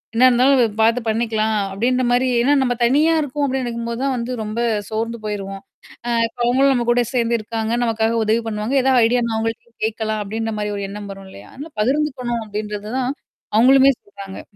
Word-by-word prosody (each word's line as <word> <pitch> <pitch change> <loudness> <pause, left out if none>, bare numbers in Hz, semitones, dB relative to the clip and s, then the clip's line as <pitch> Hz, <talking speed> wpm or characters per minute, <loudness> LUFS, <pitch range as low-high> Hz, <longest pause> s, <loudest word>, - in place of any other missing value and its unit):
என்ன 255 +2 +5
இருந்தாலும் 255 +2 +4
வ - - +5 0.2
பார்த்து 230 +2 +3
பண்ணிக்கலாம்" 220 -1 0 0.2
அப்படின்ற 250 +6 0
மாரி 250 +1 +2
ஏன்னா 285 +4 +3
நம்ம 245 -1 +1
தனியா 300 +6 +3
இருக்கோம் 290 0 -2
அப்டின்னு 265 -1 -1
நினைக்கும்போது 235 +1 -4
தான் 270 -2 0
வந்து 235 +2 -4
ரொம்ப 215 +2 -4 0.3
சோர்ந்து 230 +1 -3
போயிருவோம். 195 -2 -5 0.5
அ - - -1 0.2
இப்ப 235 - -23
அவங்களும் 270 +3 +3
நம்ம 240 -2 0
கூட 245 0 +4
சேர்ந்து 235 -1 +1
இருக்காங்க, 220 +1 -3
நமக்காக 225 0 0
உதவி 220 +2 +1
பண்ணுவாங்க. 215 +5 -2
ஏதாவது 260 -2 +4
ஐடியானா 235 -1 +1
அவங்கள்ட்டயும் 225 +1 -4
கேட்கலாம் 220 -1 -2
அப்டின்ற 225 +2 -3
மாரி 210 0 -2
ஒரு 200 - -4
எண்ணம் 205 0 -7
வரும் 195 0 -12
இல்லையா? - - -13
அதனால 295 +4 -9
பகிர்ந்துக்கணும் 255 -3 -1
அப்படின்றது 210 0 -5
தான். 255 +1 0 0.5
அவங்களுமே 270 +2 +6
சொல்றாங்க. 200 -1 -10
235 Hz, 180 wpm, -20 LUFS, 215-255 Hz, 0.5 s, அவங்களுமே